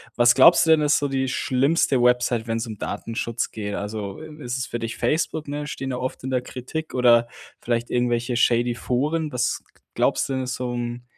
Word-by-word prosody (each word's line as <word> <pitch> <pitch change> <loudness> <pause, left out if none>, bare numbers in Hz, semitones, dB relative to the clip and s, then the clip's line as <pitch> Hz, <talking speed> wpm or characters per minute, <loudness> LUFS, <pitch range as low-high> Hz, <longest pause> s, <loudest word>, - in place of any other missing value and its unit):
Was 120 0 +5
glaubst 165 +5 +7
du - - 0
denn, 155 -1 +5
ist 150 0 +3
so 145 - -1
die 135 -1 -1
schlimmste 130 +1 +1
Website, 125 -1 +2
wenn's 115 +1 -2
um 110 -2 -7
Datenschutz 115 +2 -3
geht? 105 -2 -5
Also, 105 +2 -5
äh, 155 -2 -11
ist 125 +2 -3
es 130 - -3
für 120 - -4
dich 115 0 -4
Facebook, 155 +4 -1
ne, 145 +1 -4
stehen 135 -1 -5
da 125 - -2
oft 130 0 -4
in 130 - -3
der 125 -1 0
Kritik, 130 +6 -6
oder 120 -2 +4 0.3
vielleicht 120 0 -2
irgendwelche 120 0 0
shady 120 0 +2
Foren? 150 +6 -1
Was 125 0 -1 0.3
glaubst - - +1
du - - -1
denn 130 -1 -2
so, 125 -1 -3
hm, 120 0 -4
125 Hz, 205 wpm, -23 LUFS, 120-135 Hz, 0.3 s, glaubst